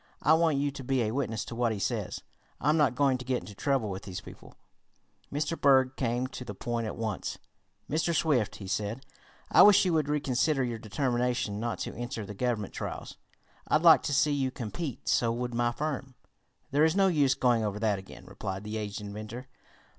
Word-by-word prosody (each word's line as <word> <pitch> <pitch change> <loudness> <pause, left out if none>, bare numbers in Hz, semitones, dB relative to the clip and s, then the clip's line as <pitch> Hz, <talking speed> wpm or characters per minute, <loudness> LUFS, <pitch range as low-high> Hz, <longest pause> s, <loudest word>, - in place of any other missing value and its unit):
"I 150 - +6
want 160 -2 +3
you 140 +1 0
to 140 -1 -8
be 130 -1 +1
a 110 - -1
witness 115 -4 -2
to - - -7
what 120 -1 +1
he 110 - -2
says. 100 - -3 0.4
I'm 150 - +2
not 150 -5 +3
going 135 -2 +2
to - - -6
get 130 -1 -1
into 105 - -10
trouble 125 -1 0
with 95 +1 -5
these 95 -2 -6
people." 95 - -13 0.8
Mr. 150 +3 -2
Berg 130 -2 +5
came 120 0 0
to 130 -1 -7
the 105 -5 -7
point 115 +2 -2
at - - -5
once. 110 -4 -3 0.5
"Mr. 160 +4 0
Swift," 135 -11 +1
he 100 - -9
said, 105 +6 -3 0.5
"I - - +7
wish 205 -2 +8
you 180 - +2
would 155 -2 +1
reconsider 140 0 +1
your 120 -2 -3
determination 120 -2 -1
not 115 0 -2
to - - -4
enter 120 -2 -5
the 105 - -7
Government 110 -1 -2
trials. - - -6 0.5
I'd - - +2
like - - +8
to - - -3
see 150 +2 +3
you 135 -2 0
compete. 130 +3 -5
So 115 -1 +2
would 120 +1 -3
my 120 0 +1
firm." 135 -1 -4 0.6
"There 145 +3 +3
is 160 +2 +3
no 195 -1 +4
use 145 -7 +3
going 120 -3 +2
over 105 -1 -2
that 105 -2 +1
again," 95 - -12
replied 95 0 -5
the 105 +1 -4
aged 105 -1 -4
inventor. 110 +5 -7
125 Hz, 205 wpm, -29 LUFS, 110-140 Hz, 0.8 s, wish